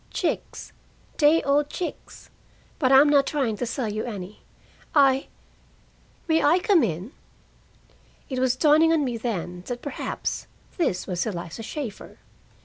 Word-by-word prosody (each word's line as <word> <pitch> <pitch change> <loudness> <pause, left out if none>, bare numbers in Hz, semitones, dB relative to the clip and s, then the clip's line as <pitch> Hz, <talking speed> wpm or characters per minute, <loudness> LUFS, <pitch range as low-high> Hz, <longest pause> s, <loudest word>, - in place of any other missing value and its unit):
"Chicks, - - -3 0.4
day 310 +2 +4
old 285 +1 +2
chicks, 355 +2 -7 0.5
but 260 -3 +2
I'm 270 +2 +7
not 285 -2 +4
trying 265 -7 0
to 245 - -3
sell 245 0 -2
you 215 +1 -3
any. 205 -4 -7 0.5
I 275 -2 +4 1.0
may 320 -1 +2
I 310 +5 +5
come 370 -2 +3
in?" 190 - -2 1.2
It 260 -2 -3
was 255 -1 +2
dawning 310 +3 +4
on 315 -3 +2
me 245 -3 -2
then 180 -6 -4
that 245 -1 -5
perhaps 285 -3 -4 0.3
this 195 - 0
was 180 +1 -2
Eliza 175 0 -5
Shaeffer. 230 -2 -7
260 Hz, 140 wpm, -25 LUFS, 215-295 Hz, 1.2 s, I'm